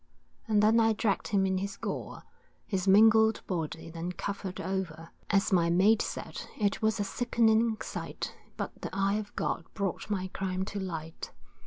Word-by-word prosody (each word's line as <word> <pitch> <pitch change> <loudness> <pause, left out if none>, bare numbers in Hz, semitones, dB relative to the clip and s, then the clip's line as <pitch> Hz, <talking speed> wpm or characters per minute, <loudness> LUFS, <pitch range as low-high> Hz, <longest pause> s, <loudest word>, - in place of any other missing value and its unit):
And 210 -1 +3
then 220 +2 +5
I 225 -1 +4
dragg'd 210 -2 0
him 195 -2 +2
in 190 -1 +1
his 200 +1 -4
gore, - - -5 0.4
His 190 -2 -2
mangled 220 +2 +6
body 165 -2 -4
then 170 +2 -4
covered 195 -1 -4
o'er, 170 -4 -4 0.2
As 195 -1 +2
my 170 -2 +4
mate 195 +6 +4
said, - - -5 0.2
it 205 -3 0
was 220 0 +1
a - - +2
sickening 225 0 +2
sight - - -5 0.2
But - - -3
the - - -4
eye 195 +2 +1
of 210 -1 -8
God - - -1
brought 200 0 -2
my 185 -3 -1
crime 190 0 -2
to 200 - -5
light. 165 -4 -5
195 Hz, 170 wpm, -30 LUFS, 185-215 Hz, 0.4 s, mangled